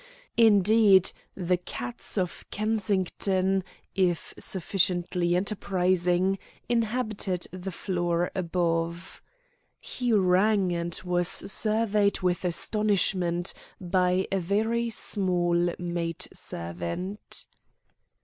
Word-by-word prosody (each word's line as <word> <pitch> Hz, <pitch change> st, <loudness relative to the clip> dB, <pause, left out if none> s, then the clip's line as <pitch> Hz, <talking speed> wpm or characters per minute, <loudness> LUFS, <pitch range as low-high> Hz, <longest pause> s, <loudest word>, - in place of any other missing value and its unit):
Indeed, 210 Hz, -3 st, +5 dB, 0.2 s
the 180 Hz, -1 st, 0 dB
cats 120 Hz, -, -5 dB
of 180 Hz, -3 st, -2 dB
Kensington, 195 Hz, -2 st, 0 dB, 0.3 s
if 180 Hz, -3 st, 0 dB
sufficiently 175 Hz, -1 st, +1 dB
enterprising, 185 Hz, -1 st, +1 dB, 0.3 s
inhabitated 220 Hz, -6 st, -1 dB, 0.2 s
the 190 Hz, -, -4 dB
floor 175 Hz, -1 st, -1 dB
above. 170 Hz, -1 st, -2 dB, 0.6 s
He 245 Hz, -2 st, -3 dB
rang, 195 Hz, -1 st, +3 dB
and 170 Hz, 0 st, -1 dB
was 175 Hz, -1 st, +1 dB
surveyed 210 Hz, -1 st, +2 dB
with 180 Hz, 0 st, 0 dB
astonishment 180 Hz, -2 st, +1 dB, 0.3 s
by 180 Hz, 0 st, +1 dB
a 195 Hz, -, +1 dB
very 220 Hz, +6 st, 0 dB
small 175 Hz, -5 st, +1 dB
maid 170 Hz, -2 st, -3 dB
servant. 85 Hz, -, -4 dB
185 Hz, 80 wpm, -27 LUFS, 175-205 Hz, 0.6 s, Indeed